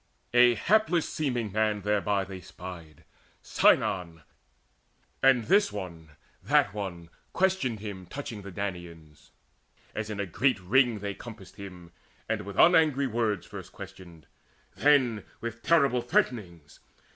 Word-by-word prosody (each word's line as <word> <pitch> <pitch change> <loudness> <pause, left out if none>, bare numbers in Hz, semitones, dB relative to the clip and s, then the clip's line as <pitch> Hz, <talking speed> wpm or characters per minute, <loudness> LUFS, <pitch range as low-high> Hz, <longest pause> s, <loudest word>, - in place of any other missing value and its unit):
A 120 -1 +6
hapless 180 - +2
seeming 125 -8 -2
man 105 0 0
thereby 105 -1 +1
they 95 -1 -8
spied, 85 -4 -11 0.4
Sinon; 85 -3 +2 1.0
and 130 -3 +5
this 200 - +3
one, 85 -5 -7 0.3
that - - +2
one 90 -5 -6 0.2
questioned 180 - 0
him 95 -4 -7
Touching 115 -3 -6
the 100 - -9
Danaans, 85 -5 -7 0.6
as 110 -1 -4
in 105 -1 -5
a 100 - -1
great 115 +5 +1
ring 115 +3 +2
They 100 -1 -3
compassed 100 -3 -12
him, 90 -4 -10 0.4
and - - -1
with 100 - -7
unangry 155 -5 +5
words 110 -6 -1
First 95 -2 -10
questioned, 95 -4 -11 0.5
then 130 -7 +3 0.2
with 115 0 -6
terrible 140 -7 +3
threatenings. 90 - -2
105 Hz, 125 wpm, -28 LUFS, 90-125 Hz, 1.0 s, A